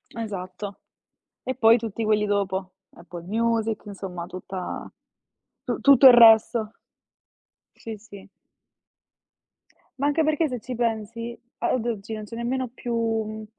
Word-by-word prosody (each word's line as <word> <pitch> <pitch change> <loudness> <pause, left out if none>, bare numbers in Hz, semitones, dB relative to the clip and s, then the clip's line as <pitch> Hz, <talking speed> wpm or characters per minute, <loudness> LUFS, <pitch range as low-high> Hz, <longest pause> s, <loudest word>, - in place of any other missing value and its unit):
Esatto. 200 -2 -6 0.7
E 260 - -3
poi 230 -1 +5
tutti 225 -1 -4
quelli 215 -1 +2
dopo. 190 -2 -2 0.2
Apple 170 0 -10
Music, 225 0 0
insomma 190 -4 -7
tutta 185 +1 -7 0.7
tu - - -3
tutto 275 -1 +7
il 250 - +10
resto. 225 -1 +6 1.1
Sì, 225 -1 -7
sì. 205 -2 -14 1.7
Ma 285 - +1
anche 310 +2 +2
perché 310 +1 +1
se 250 -4 -5
ci 250 +3 -7
pensi, 230 0 -3 0.2
a - - 0
ad 240 -2 -1
oggi 220 -2 -4
non 215 -1 -5
c'è 230 +2 -9
nemmeno 250 +1 -2
più, 240 -1 -6 0.3
mhmm, 215 0 -7
220 Hz, 130 wpm, -24 LUFS, 200-235 Hz, 1.7 s, il